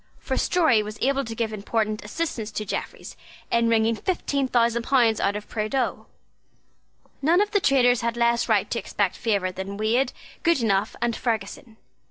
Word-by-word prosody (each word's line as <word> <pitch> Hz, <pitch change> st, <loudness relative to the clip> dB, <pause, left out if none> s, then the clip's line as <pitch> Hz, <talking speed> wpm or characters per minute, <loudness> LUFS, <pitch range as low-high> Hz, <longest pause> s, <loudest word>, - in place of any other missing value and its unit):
For -, -, -3 dB
Storey 315 Hz, -11 st, +3 dB
was 210 Hz, +1 st, -7 dB
able 275 Hz, +1 st, +1 dB
to 225 Hz, 0 st, -6 dB
give 225 Hz, -1 st, -2 dB
important 215 Hz, +1 st, -2 dB
assistance 225 Hz, -2 st, -3 dB
to 215 Hz, -, -3 dB
Jeffreys -, -, -5 dB, 0.4 s
in 235 Hz, 0 st, +3 dB
wringing 225 Hz, 0 st, +3 dB
fifteen 280 Hz, -, -1 dB
thousand 235 Hz, -1 st, +2 dB
pounds 235 Hz, -3 st, +3 dB
out 200 Hz, -, +1 dB
of 210 Hz, 0 st, -6 dB
Prideaux. 225 Hz, +4 st, -2 dB, 1.1 s
None 325 Hz, +6 st, +4 dB
of 415 Hz, 0 st, +1 dB
the 405 Hz, -, +3 dB
traitors 250 Hz, -5 st, +3 dB
had 235 Hz, 0 st, -2 dB
less 235 Hz, 0 st, +2 dB
right -, -, +3 dB
to -, -, 0 dB
expect -, -, -1 dB
favour 200 Hz, -5 st, 0 dB
than 190 Hz, +2 st, -6 dB
Wade, 225 Hz, +5 st, +1 dB, 0.3 s
Goodenough, 225 Hz, -, +1 dB
and 235 Hz, -1 st, 0 dB
Ferguson. 220 Hz, 0 st, -4 dB
230 Hz, 165 wpm, -24 LUFS, 215-260 Hz, 1.1 s, None